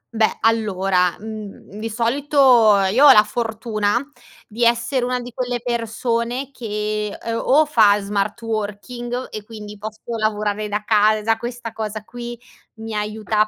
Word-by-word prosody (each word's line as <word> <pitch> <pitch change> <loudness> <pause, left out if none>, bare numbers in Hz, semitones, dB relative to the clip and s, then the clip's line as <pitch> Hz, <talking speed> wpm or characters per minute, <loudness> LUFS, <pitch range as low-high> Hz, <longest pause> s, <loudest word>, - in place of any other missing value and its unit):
Beh, 220 -1 +2
allora, 195 -5 +2
mhmm, 215 -1 -9
di 225 +1 -4
solito 255 +6 -2 0.5
io 275 +6 +6
ho - - +11
la 210 - +7
fortuna 220 -1 -1 0.5
di 230 +2 -3
essere 235 +2 +2
una 250 0 -1
di 245 -1 -9
quelle 245 -1 -2
persone 235 +2 -2
che, 210 -3 -3
uhm, 230 0 -3
o 300 +3 +4
fa 215 -8 +4
smart 200 +1 -2
working, 240 +3 -4
e 215 -1 -6
quindi 210 -1 -9
posso 215 +1 -8 0.2
lavorare 210 -1 -1
da 210 +1 -3
casa, 215 +1 +3
questa 240 -1 -6
cosa 215 -1 -5
qui 240 +1 -8 0.4
mi 225 0 -7
aiuta 215 0 0
220 Hz, 145 wpm, -21 LUFS, 210-240 Hz, 0.5 s, ho